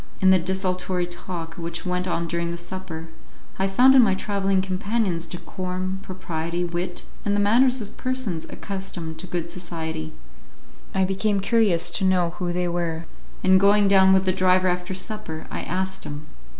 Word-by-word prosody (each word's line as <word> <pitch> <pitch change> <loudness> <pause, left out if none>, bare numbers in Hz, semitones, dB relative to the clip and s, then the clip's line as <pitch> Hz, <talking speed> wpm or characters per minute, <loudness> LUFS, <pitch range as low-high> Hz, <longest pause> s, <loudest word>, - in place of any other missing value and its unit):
In 190 0 +5
the 190 - +6
desultory 185 0 -1
talk 175 -1 -6
which 170 +1 -4
went 180 0 -1
on 170 -1 -1
during 170 0 -1
the 170 - -4
supper, 170 -2 -7 0.5
I 190 - +2
found 250 +7 +6
in 265 - +8
my 195 -5 +4
travelling 195 -1 0
companions 190 -2 -1
decorum, 185 +1 -4
propriety, 175 -2 -3
wit, 175 +1 -3 0.2
and 205 -1 +1
the - - +1
manners 245 +5 +4
of 205 - -9
persons 255 -11 -2
accustomed 190 -5 -6
to 185 - -6
good 175 -1 -2
society. 160 -3 -5 0.8
I 190 - +3
became 195 +2 0
curious 200 -5 +3
to 195 - +1
know 180 -2 +3
who 175 -1 -1
they 180 0 0
were, 170 -1 -2 0.4
and 190 0 +6
going 200 +1 +5
down 190 -1 +6
with 190 0 +4
the 185 - +3
driver 185 0 +3
after 180 +1 -2
supper, 185 -5 -4
I - - -3
asked 190 +1 -2
him. 145 +1 -6
185 Hz, 170 wpm, -24 LUFS, 170-195 Hz, 0.8 s, in